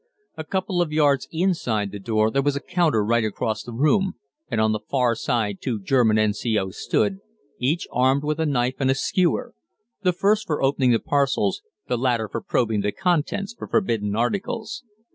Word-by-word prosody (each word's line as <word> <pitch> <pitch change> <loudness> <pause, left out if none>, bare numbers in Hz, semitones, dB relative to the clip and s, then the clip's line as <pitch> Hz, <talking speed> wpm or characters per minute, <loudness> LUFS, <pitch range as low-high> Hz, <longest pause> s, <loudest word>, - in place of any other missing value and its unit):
A 160 - -5
couple 185 +1 -1
of 165 -3 -1
yards 145 -3 +2
inside 160 - 0
the 100 - -7
door 110 +1 +1
there 135 - +2
was 145 0 0
a - - -1
counter 155 - +1
right 115 +1 +2
across 110 0 -2
the 120 - -9
room, 185 - +2 0.3
and - - -1
on 110 0 +3
the 105 - -1
far 125 +2 +1
side 110 -3 -1
two 120 -5 -2
German 110 +1 +3
N.C.O.'s 105 -2 0
stood, 100 -2 0 0.4
each 145 +7 0
armed 130 +3 +2
with 150 +1 -1
a 160 - +1
knife 125 -2 0
and 135 -2 +1
a 135 - +3
skewer 175 +5 0 0.5
the 185 -2 +3
first 205 +4 +1
for 150 -3 -1
opening 135 -1 +2
the 120 - +5
parcels, 140 - 0 0.3
the 120 - -1
latter 120 -3 +1
for 115 +2 -5
probing 110 -3 0
the 105 +1 0
contents 185 - -1
for - - -8
forbidden 110 - 0
articles. 205 - -2
130 Hz, 185 wpm, -23 LUFS, 110-160 Hz, 0.5 s, the